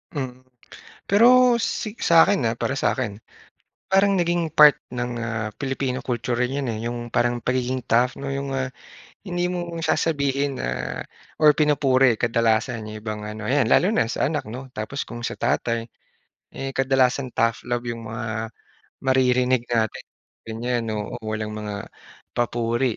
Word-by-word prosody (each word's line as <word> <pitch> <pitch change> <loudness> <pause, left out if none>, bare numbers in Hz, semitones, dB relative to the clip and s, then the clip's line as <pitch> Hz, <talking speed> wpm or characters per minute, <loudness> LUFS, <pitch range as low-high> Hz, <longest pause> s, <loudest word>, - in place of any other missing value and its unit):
Mm. 130 -3 -4 0.7
Pero 245 +3 +6
si 220 -1 -3
sa'kin, 165 -4 +4
ah, 115 - +1
para 135 +3 -2
sa'kin, 115 -7 -1 0.7
parang 195 +1 +4
naging 175 -3 0
part 150 -3 +8 0.2
ng, 125 0 -2
ah, 115 -2 -3
Pilipino 135 -1 -2
culture 120 -1 -1
rin 130 +3 0
yun, 135 - -3
eh, 110 -1 -3
yung 120 0 -4
parang 120 0 +1
pagiging 130 +1 -1
tough, 125 +3 +3
'no? 140 0 -4
Yong, 140 0 -3
ah, 130 -1 -1 0.6
hindi 175 -1 -1
mo 175 -1 -4
sasabihin 140 -4 0
na 60 0 -3 0.4
or 150 -2 +6
pinupuri 135 -5 +3
kadalasan 115 0 +1
yung 110 - -7
ibang 105 -1 -5
ano, 105 +1 -6
yan 140 0 +3
lalo 180 - +5
na 210 - +2
sa 115 +4 -1
anak, 150 -1 -2
'no. 125 +5 -8
Tapos, 110 +6 -4
kung 120 0 -7
sa - - -2
tatay, 115 0 0 0.6
eh, 135 0 -4
kadalasan 135 -1 +2
tough 115 0 0
love 120 0 -2
yong 115 -1 -5
mga 110 0 -4 0.5
maririnig 130 -1 +3
natin 115 -2 0 0.5
ganyan. 115 +1 -2
Oo, 105 -1 -4
walang 110 0 -3
mga 105 -1 -5 0.5
papuri. 120 0 0
125 Hz, 150 wpm, -23 LUFS, 115-140 Hz, 0.7 s, part